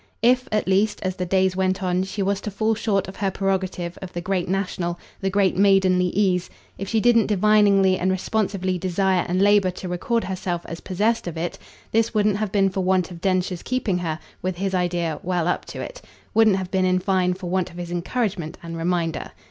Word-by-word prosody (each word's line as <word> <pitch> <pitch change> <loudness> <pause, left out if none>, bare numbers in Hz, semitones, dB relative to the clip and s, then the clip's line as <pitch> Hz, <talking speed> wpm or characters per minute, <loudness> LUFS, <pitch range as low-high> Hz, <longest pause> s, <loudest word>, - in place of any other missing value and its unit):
If, 250 +2 +4
at 215 -2 0
least, 200 +3 +2
as 185 -1 -2
the 180 - -2
days 190 0 +2
went 190 +1 0
on, 180 0 +1
she 195 +1 -3
was 200 0 0
to - - -4
fall 220 +2 0
short 205 -3 0
of 190 - -9
her 195 -1 0
prerogative 190 -2 -2
of 190 -1 -8
the 175 - -3
great 180 0 -1
national, 185 -2 -2 0.2
the 195 - -1
great 190 -2 +2
maidenly 190 -2 +4
ease, 185 -1 +1 0.3
if 195 - -4
she 225 - +2
didn't 230 0 +4
diviningly 200 -2 +4
and 185 - +1
responsively 190 -1 -1
desire 185 0 +1
and 180 +1 +1
labour 205 -2 +5
to 185 +1 -7
record 225 +7 -1
herself 180 -2 -3
as 170 - -7
possessed 210 +3 0
of 170 -1 -5
it, 170 +2 -3 0.3
this 225 +1 +1
wouldn't 210 -1 +3
have 215 -2 -2
been 195 -2 +2
for 190 - -2
want 185 -1 +1
of 170 -1 -10
Densher's 185 -2 0
keeping 245 -8 -1
her, 160 -3 -2 0.2
with 185 -1 -2
his 195 +1 -2
idea, 175 -3 0
well 175 -2 -1
up - - -1
to - - -8
it - - -7 0.3
wouldn't 220 -3 +5
have 185 -1 -5
been 190 -1 +2
in 185 0 +3
fine 185 -1 +1
for 180 -2 -6
want 185 -1 0
of 170 - -13
his 175 -1 -6
encouragement 180 -2 -2
and 165 0 -6
reminder. 165 -1 -1
190 Hz, 210 wpm, -23 LUFS, 180-200 Hz, 0.3 s, labour